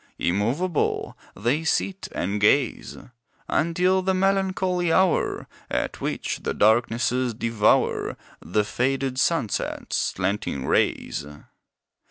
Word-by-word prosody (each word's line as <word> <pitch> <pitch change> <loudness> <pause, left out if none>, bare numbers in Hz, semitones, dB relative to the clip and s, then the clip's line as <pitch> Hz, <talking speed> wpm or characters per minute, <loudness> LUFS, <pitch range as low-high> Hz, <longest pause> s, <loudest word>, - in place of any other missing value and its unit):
Immovable, 125 - 0 0.2
they 120 +10 0
sit 190 +4 -1
and 100 +3 -2
gaze, 125 +4 +2 0.5
Until 180 +4 +2
the 190 0 0
melancholy 185 -2 +1
hour, 185 0 +2 0.2
At - - -2
which - - -3
the - - -3
darknesses 120 +2 +2
devour 115 -2 +1 0.2
The 105 - 0
faded 130 +3 -1
sunset's 150 - 0
slanting 95 -8 -2
rays. - - 0
130 Hz, 95 wpm, -24 LUFS, 110-180 Hz, 0.5 s, gaze